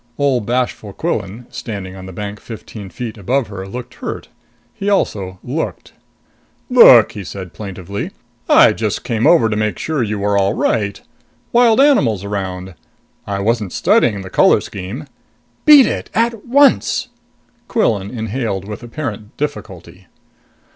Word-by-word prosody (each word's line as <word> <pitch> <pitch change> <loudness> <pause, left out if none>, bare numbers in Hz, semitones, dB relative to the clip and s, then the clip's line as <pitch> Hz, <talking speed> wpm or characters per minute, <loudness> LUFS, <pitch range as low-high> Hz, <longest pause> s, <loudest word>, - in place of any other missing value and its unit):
Ole 140 -4 +2
bashful 120 -3 -2
Quillan, 110 - -3
standing 100 -4 -6
on 95 -1 -9
the - - -8
bank 100 +2 -6
fifteen 110 -3 -9
feet 115 +1 -7
above 125 +5 0
her, 95 -1 -7
looked 125 +5 -7
hurt. - - -6 0.4
He 200 - -3
also 95 - -1
looked. - - -4 0.8
"Look!" - - +8
he 105 - -7
said 95 -1 -8
plaintively. 100 -1 -6 0.4
"I - - +7
just - - -2
came 115 0 0
over 165 -10 +5
to 110 - -1
make 105 -3 -1
sure 155 -4 -2
you 105 -2 -1
were 100 0 +1
all 100 +2 +1
right 100 -3 0 0.5
wild 235 -1 +4
animals 140 - +3
around! 95 -2 -4 0.5
I 100 -1 -2
wasn't 110 -2 -1
studying 105 -5 +2
the 95 -1 -9
color - - +5
scheme." 100 +10 -7 0.6
"Beat 295 -4 +9
it! - - -3
At 230 0 0
once!" 255 -1 +3 0.6
Quillan 105 - 0
inhaled 110 -4 -3
with 105 +2 -7
apparent 120 -4 -6
difficulty. 95 - -6
105 Hz, 140 wpm, -17 LUFS, 100-130 Hz, 0.8 s, Beat